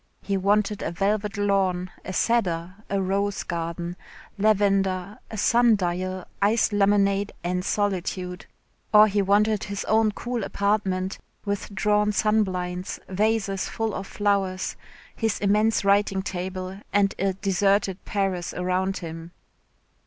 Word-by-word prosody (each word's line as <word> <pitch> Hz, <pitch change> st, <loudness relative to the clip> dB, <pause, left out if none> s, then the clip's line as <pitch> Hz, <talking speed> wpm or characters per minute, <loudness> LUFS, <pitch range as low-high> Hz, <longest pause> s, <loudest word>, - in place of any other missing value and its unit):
He 200 Hz, -, -1 dB
wanted 205 Hz, +2 st, +1 dB
a -, -, -2 dB
velvet 200 Hz, +4 st, -1 dB
lawn, 190 Hz, -3 st, +1 dB
a -, -, -5 dB
cedar, 185 Hz, -6 st, 0 dB, 0.2 s
a 200 Hz, -, 0 dB
rose 195 Hz, +1 st, 0 dB
garden, 170 Hz, +1 st, -4 dB, 0.4 s
lavender, 195 Hz, -1 st, +1 dB
a 220 Hz, -, -6 dB
sun 235 Hz, +2 st, +4 dB
dial, 185 Hz, 0 st, -2 dB, 0.2 s
iced 210 Hz, +2 st, +3 dB
lemonade 200 Hz, 0 st, +2 dB
and 180 Hz, +1 st, -1 dB
solitude. 185 Hz, -3 st, -2 dB, 0.4 s
Or 215 Hz, 0 st, +8 dB
he 205 Hz, 0 st, +1 dB
wanted 205 Hz, +2 st, +2 dB
his 200 Hz, -1 st, -4 dB
own 220 Hz, 0 st, +3 dB
cool 240 Hz, -1 st, -3 dB
apartment, 195 Hz, -2 st, -1 dB, 0.3 s
with 200 Hz, 0 st, -3 dB
drawn 210 Hz, +1 st, +2 dB
sunblinds, 185 Hz, -4 st, 0 dB
vases 200 Hz, 0 st, 0 dB
full 225 Hz, -2 st, -2 dB
of 195 Hz, -, -5 dB
flowers, 195 Hz, -2 st, 0 dB, 0.4 s
his 225 Hz, -2 st, 0 dB
immense 210 Hz, +1 st, +2 dB
writing 200 Hz, -1 st, +3 dB
table, 185 Hz, 0 st, -5 dB
and 200 Hz, -1 st, +3 dB
a 195 Hz, 0 st, +1 dB
deserted 195 Hz, 0 st, +1 dB
Paris 195 Hz, -3 st, -2 dB
around 185 Hz, +2 st, 0 dB
him. 165 Hz, +1 st, -7 dB
195 Hz, 125 wpm, -25 LUFS, 185-210 Hz, 0.4 s, Or